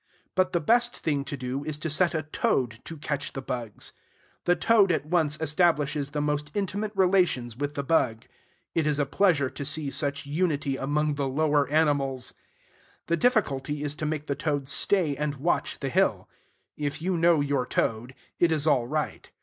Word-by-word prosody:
But 185 0 +2
the 170 - +1
best 240 +9 +2
thing 145 -3 -1
to 145 - -5
do 130 +2 -4
is 155 -1 -2
to 155 - -4
set 170 +2 +2
a 155 - -1
toad 125 -6 -1
to 165 - -7
catch 145 -1 -3
the 135 - -5
bugs. 120 -5 -5 0.5
The 175 - +4
toad 200 +2 +4
at 155 - 0
once 155 -2 +1
establishes 150 -2 +1
the 150 +1 -2
most 150 0 -1
intimate 205 +1 -2
relations 180 - +2
with 145 +3 -3
the 140 - -2
bug. 130 -7 +1 0.5
It 160 -2 +1
is 150 -1 +1
a 145 - +1
pleasure 155 -3 +2
to 145 - -6
see 150 -1 -1
such 140 -1 -1
unity 150 -2 0
among 150 +3 0
the 140 -1 -2
lower 145 0 +2
animals. 140 -4 +1 0.7
The 170 - +1
difficulty 150 - +1
is 145 -1 -2
to 155 - -2
make 150 -1 -3
the 140 - -1
toad 140 -1 -2
stay 150 +2 +3
and 150 0 -2
watch 155 +6 -1
the - - -1
hill. - - +1 0.5
If 145 0 -3
you 185 0 0
know 170 -1 +4
your 140 -3 0
toad, 120 +2 -1 0.2
it 170 -1 +4
is 155 -2 +1
all 125 -6 +3
right. 150 +2 -3
150 Hz, 185 wpm, -27 LUFS, 140-165 Hz, 0.7 s, The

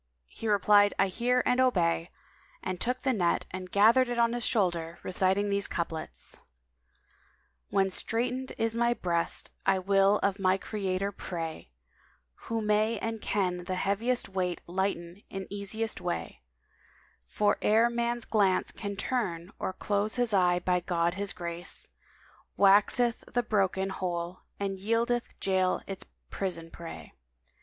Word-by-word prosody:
He 225 - -6
replied, 205 0 +5
"I 195 0 +3
hear 245 +6 +1
and 250 - +2
obey," 175 -8 +2 0.5
and 185 - -4
took 250 +2 -1
the 265 -2 +2
net 175 -6 +1
and 185 0 -6
gathered 230 +6 +5
it 240 - -2
on 235 0 +3
his 240 -1 -2
shoulder, 170 -8 0
reciting 190 +2 +1
these 200 0 +2
couplets, 165 -2 -5 1.3
"When 195 -1 +2
straitened 250 +6 -2
is 225 0 0
my 235 0 +2
breast 170 -4 -1
I 195 0 +3
will 195 +2 +3
of 200 0 +1
my 190 0 +3
Creator 195 -1 -2
pray, 165 - -6 0.4
* 60 -1 -37
Who 225 -1 -1
may 215 +2 +2
and 225 +1 -4
can 180 -3 -1
the 185 0 -2
heaviest 210 +7 0
weight 185 -2 -2
lighten 180 0 -2
in 195 0 -5
easiest 205 +2 -2
way; 85 0 -4 0.8
For 205 - +1
ere 225 +2 +4
man's 235 0 -1
glance 195 -4 +2
can 200 -1 -5
turn 190 -6 -2
or - - -2
close 205 +2 -1
his 245 -3 +1
eye 180 -2 +4
by 180 0 +1
God 170 -1 0
His 200 +1 -2
grace 170 0 -3 0.3
* - - -30
Waxeth 210 +4 +4
the 245 - +1
broken 195 -3 +1
whole 175 -1 -3 0.2
and 195 -1 -2
yieldeth 230 +4 0
jail 185 -1 +1
its 195 -1 -6 0.3
prison 165 -4 -3
prey. 170 -1 -9
195 Hz, 145 wpm, -29 LUFS, 180-225 Hz, 1.3 s, replied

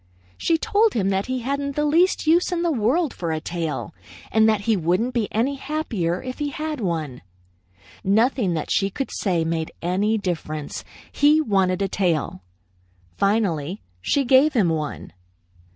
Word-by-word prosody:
She 330 - +1
told 425 +6 +2
him 195 -4 +1
that 195 0 0
he 255 -1 -2
hadn't 280 +2 -2
the 295 - +1
least 335 +5 +3
use 340 +4 +3
in 345 -1 -1
the 340 - +2
world 275 +5 +1
for 170 -2 -3
a 160 - -1
tail, 165 0 -4 0.4
and 220 0 +4
that 215 -2 +1
he 220 +2 +2
wouldn't 185 +8 0
be 230 -4 -1
any 260 +6 0
happier 235 - -2
if 255 +2 -6
he 295 -1 -1
had 305 -3 -4
one. 160 - -3 0.8
Nothing 215 -1 +2
that 155 - -3
she 195 - +2
could 270 +7 -4
say 175 -5 0
made 160 -1 -2
any 195 +6 +1
difference 155 -6 -4 0.3
he 300 +2 +4
wanted 195 - +1
a - - +1
tail. 170 - -1 0.8
Finally 195 -4 0 0.2
she 275 - +1
gave 265 +4 +5
him 210 -9 +3
one. 155 -2 -4
215 Hz, 165 wpm, -23 LUFS, 175-280 Hz, 0.8 s, gave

